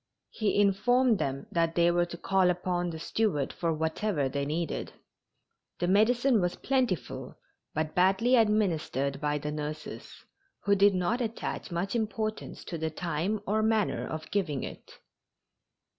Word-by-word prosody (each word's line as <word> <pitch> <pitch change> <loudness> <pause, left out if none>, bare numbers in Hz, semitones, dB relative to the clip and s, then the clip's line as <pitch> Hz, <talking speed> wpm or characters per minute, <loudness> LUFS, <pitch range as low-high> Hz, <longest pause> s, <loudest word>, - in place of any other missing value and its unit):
He 210 -2 0
informed 215 +4 +3
them 135 0 -2
that 165 -1 +1
they 170 0 +4
were 175 0 +2
to 170 - -7
call 190 0 +2
upon 180 0 -1
the 160 - -5
steward 160 -4 -1
for 170 -1 -1
whatever 160 0 0
they 140 +1 -2
needed. 165 +2 -3 0.8
The 175 - -1
medicine 235 +4 +4
was 175 0 0
plentiful, 255 - -1 0.4
but 155 0 -1
badly 195 +7 +4
administered 165 - +1
by 150 0 0
the 150 +1 -4
nurses, 150 0 -6 0.5
who 200 - +3
did 200 0 +5
not 200 +7 0
attach 230 -1 -4
much 180 +5 -2
importance 215 -1 -3
to 170 - -5
the 160 0 -1
time 175 +6 -2
or 215 +2 +1
manner 220 -1 +1
of 155 0 -6
giving 170 -9 -1
it. - - -8
180 Hz, 145 wpm, -29 LUFS, 160-215 Hz, 0.8 s, did